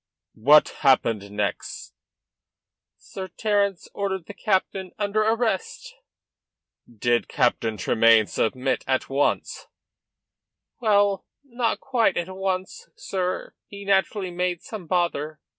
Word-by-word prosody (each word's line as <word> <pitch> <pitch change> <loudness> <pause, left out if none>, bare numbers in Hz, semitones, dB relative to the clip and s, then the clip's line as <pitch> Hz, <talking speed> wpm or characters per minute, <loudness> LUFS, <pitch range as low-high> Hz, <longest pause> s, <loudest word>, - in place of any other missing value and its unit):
"What 145 +7 +5
happened 115 -7 +2
next?" 105 0 -4 1.0
"Sir 190 -1 -8
Terence 200 -3 0
ordered 190 -3 -3
the 205 - -9
captain 190 -2 -1
under 210 +1 0
arrest." 250 - -1 1.0
"Did 120 +1 0
Captain 110 -2 0
Tremayne 110 +3 +4
submit 130 +5 -1
at 130 -1 0
once?" 140 +1 0 1.1
"Well, 205 -4 +2 0.2
not 240 -4 -2
quite 250 -4 +1
at 185 +2 -3
once, 190 -1 -3
sir. 185 -1 -3
He 200 0 -10
naturally 195 -1 +1
made 180 -1 -2
some 205 -7 -8
bother. 155 -3 -1
185 Hz, 105 wpm, -24 LUFS, 140-205 Hz, 1.1 s, What